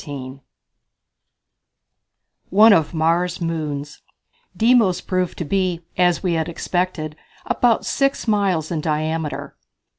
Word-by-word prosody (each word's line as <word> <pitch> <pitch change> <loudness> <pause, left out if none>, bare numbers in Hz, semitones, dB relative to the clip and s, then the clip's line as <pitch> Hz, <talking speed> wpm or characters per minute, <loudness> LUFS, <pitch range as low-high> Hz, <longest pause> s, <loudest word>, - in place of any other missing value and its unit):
On 135 -1 -7 2.1
One 215 +3 +7
of 160 -6 +2
Mars' 170 +2 0
Moons. 150 -4 -4 0.6
Deimos 225 -5 +4
proved 185 -1 -2
to 170 - -4
be, 185 0 -1
as 180 0 +2
we 180 -2 +1
had 160 0 -1
expected, 170 -3 -2 0.3
about 240 -2 +2
six 275 -3 0
miles 195 -7 +1
in 160 -3 -1
diameter. 155 0 -3
170 Hz, 110 wpm, -21 LUFS, 155-190 Hz, 2.1 s, One